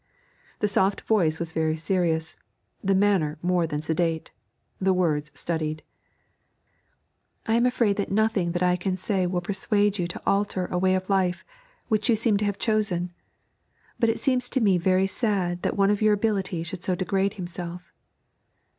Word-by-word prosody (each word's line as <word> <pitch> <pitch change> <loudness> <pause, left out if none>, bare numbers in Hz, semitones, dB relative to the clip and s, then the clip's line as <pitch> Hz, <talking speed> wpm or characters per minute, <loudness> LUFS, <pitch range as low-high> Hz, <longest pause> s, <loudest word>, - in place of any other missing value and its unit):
The 210 - +3
soft 195 0 +1
voice 170 -8 +1
was 165 -1 -4
very 160 -1 0
serious, 165 -1 0 0.5
the 195 0 +2
manner 190 -6 +2
more 180 -1 +2
than 150 0 -3
sedate, 160 0 -1 0.5
the 190 0 +2
words 150 -5 0
studied. 155 -2 -3 1.6
'I 225 - +1
am 235 - +3
afraid 235 -5 +1
that 200 - -2
nothing 205 -4 +1
that 175 0 0
I 180 0 +3
can 185 +1 -2
say 190 -1 0
will 175 0 -1
persuade 205 +2 +1
you 175 - 0
to 175 - -7
alter 195 -2 +1
a 180 - 0
way 185 0 +3
of 185 0 -3
life 190 -2 0 0.4
which 215 0 0
you 230 - +5
seem 220 -1 +2
to 210 - -1
have 205 -1 -1
chosen, 195 -6 0 0.9
but 230 - +3
it 225 - -1
seems 250 -2 +1
to 265 - 0
me 195 -6 +3
very 185 +2 +3
sad 195 -4 -1
that - - -2
one 200 0 +4
of 210 - 0
your 215 0 +5
ability 195 -5 -1
should 175 +2 -7
so 185 -1 0
degrade 195 +2 0
himself.' 180 -1 -7
185 Hz, 170 wpm, -25 LUFS, 175-205 Hz, 1.6 s, you